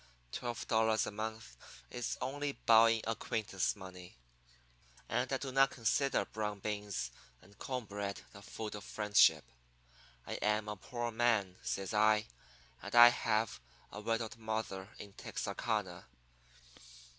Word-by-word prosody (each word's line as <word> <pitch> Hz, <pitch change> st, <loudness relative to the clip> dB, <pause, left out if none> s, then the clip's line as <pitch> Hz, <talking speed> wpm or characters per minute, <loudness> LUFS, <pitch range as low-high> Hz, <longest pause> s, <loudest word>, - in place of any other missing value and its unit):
Twelve 120 Hz, -, -4 dB
dollars 110 Hz, -1 st, +3 dB
a -, -, -4 dB
month 110 Hz, -, -5 dB, 0.4 s
is 120 Hz, -2 st, -3 dB
only 145 Hz, +2 st, -2 dB
bowing 115 Hz, -2 st, +5 dB
acquaintance 110 Hz, -3 st, -1 dB
money. 95 Hz, -4 st, -11 dB, 0.9 s
And -, -, -1 dB
I -, -, +2 dB
do 135 Hz, -1 st, -5 dB
not 135 Hz, +1 st, +5 dB
consider 130 Hz, +4 st, +1 dB
brown 105 Hz, -1 st, -3 dB
beans 105 Hz, -10 st, -3 dB, 0.3 s
and 100 Hz, -, -20 dB
corn 125 Hz, -3 st, -3 dB
bread 100 Hz, -1 st, -4 dB
the 100 Hz, -, -11 dB
food 110 Hz, +1 st, -6 dB
of 105 Hz, -1 st, -7 dB
friendship. 105 Hz, -1 st, +4 dB, 0.8 s
I -, -, -4 dB
am 105 Hz, 0 st, +1 dB
a 105 Hz, -, -3 dB
poor 120 Hz, +3 st, -4 dB
man,' 110 Hz, -5 st, +1 dB
says 95 Hz, +2 st, -3 dB
I, 105 Hz, 0 st, +4 dB, 0.6 s
'and -, -, -6 dB
I 120 Hz, 0 st, +11 dB
have 110 Hz, -, 0 dB, 0.3 s
a 105 Hz, -, -7 dB
widowed 115 Hz, 0 st, -2 dB
mother 110 Hz, -3 st, -4 dB
in 100 Hz, -1 st, -10 dB
Texarkana. -, -, -3 dB
110 Hz, 135 wpm, -34 LUFS, 105-115 Hz, 0.9 s, I